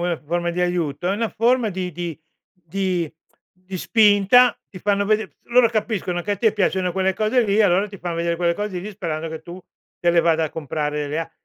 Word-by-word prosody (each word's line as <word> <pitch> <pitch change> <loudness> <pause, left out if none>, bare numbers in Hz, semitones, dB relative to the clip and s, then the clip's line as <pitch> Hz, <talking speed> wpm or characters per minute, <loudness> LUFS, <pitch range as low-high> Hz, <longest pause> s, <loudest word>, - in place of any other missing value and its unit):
una 175 -1 0
forma 170 +3 -2
di 175 +1 -3
aiuto, 175 -2 -1
è - - +2
una 225 +1 -1
forma 235 -1 +1
di 185 -1 -4
di 170 -1 -5 0.3
di 180 -1 -3 0.4
di 185 +1 -9
spinta 215 +4 +5
ti 185 - -11
fanno 200 +1 +1
veder 215 -5 0
loro 240 0 +4
capiscono 210 -5 -2
che 205 - -1
a 205 - -2
te 220 +1 +2
piacciono 190 -3 0
quelle 190 0 0
cose 220 +5 +2
lì, 200 -1 +1
e 220 - +5
allora 195 +2 +3
ti 200 - -11
fan 175 -1 -4
vedere 170 0 -1
quelle 170 0 +1
cose 205 -1 -4
lì, 200 +4 -6
sperando 165 -5 -4
che 160 0 -7
tu 175 +3 -9 0.4
te 175 - +2
le 170 - +4
vada 165 -1 +2
a 155 - -4
comprare 150 -1 -3
le 150 +2 -2
a 165 0 -4
180 Hz, 220 wpm, -22 LUFS, 170-205 Hz, 0.4 s, spinta